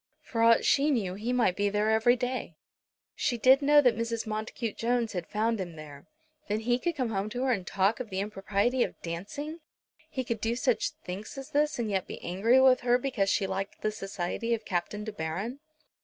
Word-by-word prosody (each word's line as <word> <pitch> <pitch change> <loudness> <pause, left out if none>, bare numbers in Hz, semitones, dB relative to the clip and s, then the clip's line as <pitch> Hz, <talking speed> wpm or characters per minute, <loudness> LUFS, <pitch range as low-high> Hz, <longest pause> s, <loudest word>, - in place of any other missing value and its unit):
For 230 - -3
aught 230 0 +5
she 285 +2 +4
knew, 215 -10 0
he 215 +5 -3
might 235 -7 +2
be 205 +1 +1
there 210 +2 +1
every 220 +3 +4
day! 250 -8 -3 0.6
She 240 - -1
did 260 +4 +6
know 290 +1 +6
that 250 -4 +4
Mrs. 230 0 -2
Montacute 215 +1 -4
Jones 235 -1 0
had 175 -3 -4
found 220 +1 0
him 175 -3 -6
there. 150 -2 -11 0.4
Then 210 +1 -1
he 240 +2 +1
could 340 +4 -1
come 255 -5 -1
home 200 0 -1
to 245 +3 -3
her 265 - +2
and 190 -7 -1
talk 195 +6 +1
of 250 -4 -5
the 190 -1 -3
impropriety 205 +4 0
of - - -1
dancing! 210 - -5 0.5
He 260 -4 -3
could 230 -3 -3
do 230 +1 0
such 240 -3 +1 0.2
thinks 195 +8 -6
as 270 +2 -8
this, 300 +1 +1
and 235 -2 -1
yet 190 -2 -1
be - - -7
angry 215 +9 +3
with 260 -1 +6
her 245 0 +3
because 245 -7 0
she 200 - +2
liked 195 +1 -4
the 215 - +1
society 200 +3 -2
of 220 - -10
Captain 195 +3 -2
De 215 - -5
Baron! 200 - -4
225 Hz, 215 wpm, -29 LUFS, 195-250 Hz, 0.6 s, did